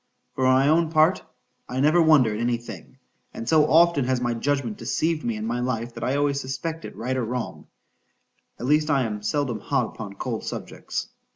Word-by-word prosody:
For 130 - 0
my 130 +2 +4
own 160 +2 +3
part, 160 +3 +3 0.5
I 125 - -3
never 155 +5 +4
wonder 150 -9 +5
at 105 - -4
any 120 0 +1
thing;—and 115 +1 -12
so 155 0 +4
often 165 -4 +4
has 130 0 +1
my 120 -1 -1
judgment 125 -2 -1
deceived 155 +6 -1
me 115 -2 -1
in 105 0 -4
my 120 +2 -2
life, 120 -1 -2
that 115 - -7
I 130 +3 0
always 140 -1 +1
suspect 140 +5 -5
it, - - -9
right 125 +3 -3
or 130 - -1
wrong,—at 120 0 -9
least 150 +3 +2
I 140 -3 +3
am 105 -3 -4
seldom 120 +1 -1
hot 135 +3 0
upon 100 -3 -8
cold 115 -1 -4
subjects. - - -5
130 Hz, 190 wpm, -24 LUFS, 115-150 Hz, 0.5 s, wonder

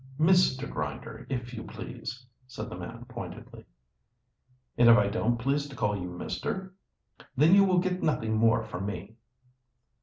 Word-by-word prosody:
"Mr. 160 -5 +4
Grinder, - - -5
if 125 -2 -4
you 110 - -5
please," 115 +3 -7 0.2
said 130 - -7
the - - -5
man - - -8
pointedly. - - -9 1.1
"And 120 0 +6
if 115 - +9
I 100 -1 +3
don't 115 +3 0
please 140 +4 0
to 140 - -10
call 105 -4 0
you 90 -2 -4
Mister?" 190 - -4 0.6
"Then 155 +6 +6
you 200 0 +8
will 185 -2 +3
get 185 0 0
nothing 110 -7 0
more 115 +1 +3
from 95 +3 -5
me." 105 +1 -6
120 Hz, 155 wpm, -29 LUFS, 110-155 Hz, 1.1 s, if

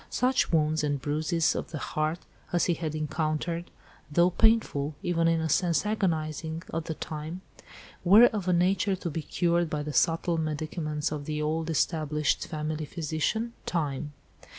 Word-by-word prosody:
Such 255 +1 +1
wounds 155 -1 +2
and 145 -1 0
bruises 155 +4 +1
of - - -4
the 160 - -5
heart, 155 +3 -1 0.3
as 175 - +2
he 175 - +2
had 160 -2 -3
encountered, 155 +2 -2 0.4
though 175 +4 +4
painful, 180 -10 +2
even 170 -1 +2
in 165 0 +3
a 160 - -1
sense 170 +4 +2
agonising, 160 -5 -1
at 165 0 -2
the 160 - -4
time, 155 +5 -6 0.6
were 205 +7 +8
of 210 -6 0
a - - +3
nature 190 +3 +2
to 180 -2 -4
be 160 - -3
cured 170 +1 +1
by 150 -1 -2
the 150 0 -5
subtle 165 +1 +2
medicaments 155 -1 -2
of 150 -2 -4
the 150 0 -3
old 160 +2 -1
established 155 -2 0
family 155 0 -3
physician, 170 +9 -2
Time. 150 -3 -2
160 Hz, 160 wpm, -28 LUFS, 155-175 Hz, 0.6 s, were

